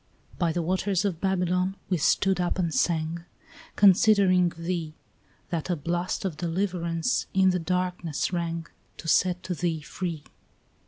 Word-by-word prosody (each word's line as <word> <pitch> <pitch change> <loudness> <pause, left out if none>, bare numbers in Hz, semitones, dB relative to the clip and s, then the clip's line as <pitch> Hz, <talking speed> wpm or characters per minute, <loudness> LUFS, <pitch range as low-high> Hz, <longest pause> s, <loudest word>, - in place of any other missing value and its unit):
By 170 -3 +2
the 170 +1 -1
waters 190 +2 0
of 180 -5 -2
Babylon 185 0 0
we 185 - +1
stood 190 +4 +2
up 175 - -1
and 170 -4 0
sang, 165 +3 0 0.5
Considering 190 -2 +5
thee, 165 -2 -3 0.6
That 170 0 -2
a 175 - +1
blast 175 +5 -2
of 170 -6 -3
deliverance 170 +2 -1
in 190 -1 +5
the 180 - 0
darkness 180 -1 -2
rang, 170 -1 -2 0.3
To - - -9
set 180 +2 +2
thee 170 -3 -2
free. 160 +2 -5
175 Hz, 140 wpm, -26 LUFS, 165-185 Hz, 0.6 s, Considering